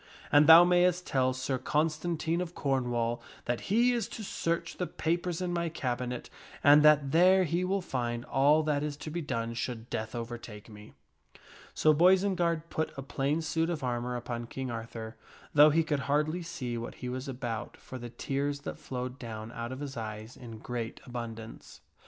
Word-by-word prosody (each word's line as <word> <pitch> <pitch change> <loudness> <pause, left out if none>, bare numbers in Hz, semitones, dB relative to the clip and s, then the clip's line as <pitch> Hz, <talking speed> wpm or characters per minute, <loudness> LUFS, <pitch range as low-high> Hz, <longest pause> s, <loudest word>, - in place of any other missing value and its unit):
And 145 +1 +6
thou 165 +2 +11
mayst 180 0 +3
tell 130 -1 +2
Sir 130 0 -2
Constantine 160 +4 0
of 175 -1 -5
Cornwall 120 -4 0 0.2
that 120 -1 -3
he 240 +5 +4
is 235 -2 -1
to 220 - -7
search 170 -3 -2
the 180 - -2
papers 175 +1 -2
in 175 -1 -2
my 170 -1 -1
cabinet, 125 -4 -3 0.4
and 145 +2 +8
that 150 -2 +5
there 185 +4 +6
he 175 +2 0
will 195 +2 0
find 120 -5 -3
all 145 +4 +4
that 150 -2 0
is 150 -1 -3
to 155 - -7
be 170 +2 -3
done 115 -6 -3
should 115 -1 -5
death 110 +2 -3
overtake 115 -2 -7
me." 105 0 -13 0.8
So 155 - +5
Boisenard 175 -1 +3
put 160 - -1
a 135 - -5
plain 140 +4 -1
suit 160 +1 0
of 160 -5 -3
armor 125 0 -2
upon 120 -1 -4
King 130 0 -5
Arthur, 115 0 -6 0.4
though 150 +1 +8
he 160 +2 +3
could 150 -2 -1
hardly 150 +4 +1
see 135 -9 -4
what 115 - -6
he 125 - -7
was 130 +2 -4
about 120 -4 -5
for 130 - -9
the 120 0 -7
tears 140 +3 -2
that - - -6
flowed 125 +1 -5
down 110 -2 -7
out 115 +1 -5
of 130 +2 -6
his 140 -2 -5
eyes 110 +1 -6
in 115 -3 -9
great 115 0 -5
abundance. 115 -2 -8
140 Hz, 180 wpm, -30 LUFS, 120-165 Hz, 0.8 s, thou